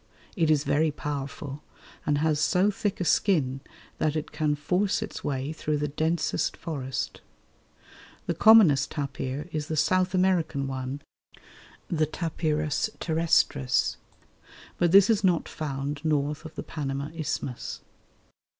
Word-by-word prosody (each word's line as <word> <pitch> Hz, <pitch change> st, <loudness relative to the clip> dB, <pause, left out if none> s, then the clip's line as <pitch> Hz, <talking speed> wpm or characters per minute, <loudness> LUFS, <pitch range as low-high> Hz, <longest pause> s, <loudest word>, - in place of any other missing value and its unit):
It 165 Hz, -5 st, +2 dB
is 150 Hz, -2 st, +3 dB
very 155 Hz, +2 st, +2 dB
powerful, 145 Hz, -1 st, -5 dB, 0.5 s
and 145 Hz, -, +3 dB
has 155 Hz, 0 st, +1 dB
so 180 Hz, +6 st, +3 dB
thick 205 Hz, 0 st, -2 dB
a 180 Hz, -, -1 dB
skin 140 Hz, -10 st, +2 dB, 0.4 s
that 155 Hz, -1 st, +1 dB
it 155 Hz, -, -3 dB
can 150 Hz, -1 st, 0 dB
force 185 Hz, +8 st, 0 dB
its 215 Hz, -, -7 dB
way 140 Hz, +1 st, -2 dB
through 150 Hz, -1 st, -1 dB
the 150 Hz, 0 st, -1 dB
densest 160 Hz, +4 st, -1 dB
forest. 135 Hz, -5 st, -4 dB, 1.0 s
The -, -, 0 dB
commonest 170 Hz, -11 st, +6 dB
tapir 140 Hz, 0 st, -4 dB
is 150 Hz, -1 st, -3 dB
the 155 Hz, -, -3 dB
South 185 Hz, +4 st, +2 dB
American 180 Hz, -6 st, +1 dB
one, 135 Hz, +1 st, -4 dB, 0.8 s
the 155 Hz, -2 st, +1 dB
T. 165 Hz, -, -5 dB, 0.7 s
terrestris, 160 Hz, -5 st, +2 dB, 0.8 s
but 175 Hz, -1 st, +3 dB
this 195 Hz, +1 st, +8 dB
is 220 Hz, -2 st, +2 dB
not 180 Hz, -3 st, +2 dB
found 140 Hz, -1 st, -4 dB
north 150 Hz, 0 st, 0 dB
of 160 Hz, -, -9 dB
the -, -, -5 dB
Panama 140 Hz, -1 st, -4 dB
Isthmus. 140 Hz, -5 st, -4 dB
150 Hz, 130 wpm, -27 LUFS, 140-170 Hz, 1.0 s, this